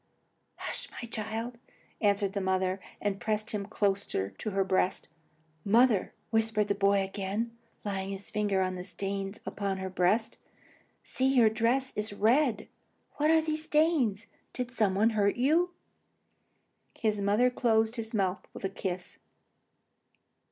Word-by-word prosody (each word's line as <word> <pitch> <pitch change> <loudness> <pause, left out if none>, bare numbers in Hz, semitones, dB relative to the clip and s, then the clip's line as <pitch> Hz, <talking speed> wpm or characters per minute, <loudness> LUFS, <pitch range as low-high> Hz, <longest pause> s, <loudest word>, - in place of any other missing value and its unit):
"Oh, - - -10
hush, - - -3
my 235 - -6
child," 225 +2 -4 0.4
answered 200 -2 +2
the 200 - -1
mother, 190 0 0 0.2
and 200 -1 -1
pressed 215 +1 -1
him 200 -2 -3
closer 200 - 0
to 95 - -5
her 195 -1 0
side. 185 0 +1 0.6
"Mother," 225 -1 +3 0.2
whispered 220 -2 +2
the - - +4
boy 200 0 +3
again, 200 +4 -3 0.3
laying 195 -1 -2
his 195 0 -6
finger 205 -3 +1
on 185 0 -1
the 180 -1 -5
stains 195 +2 -4
upon 200 -2 -2
her 190 0 -4
breast, 195 +5 +1 0.6
"see, 260 - 0
your 225 -4 +6
dress 240 +4 +1
is 210 0 -2
red! 225 +1 +2 0.5
What 300 +1 +2
are 320 0 +5
these 310 0 -2
stains? 300 - +2 0.3
Did 250 -1 -3
some 215 -5 +2
one 220 +4 +4
hurt 205 -2 +2
you?" 315 +8 +3 1.3
The 210 -2 +1
mother 210 +5 +3
closed 225 -2 +2
his 225 -1 -3
mouth 190 -3 -1
with - - -8
a 195 - 0
kiss. 185 -2 -5
210 Hz, 145 wpm, -30 LUFS, 195-230 Hz, 1.3 s, your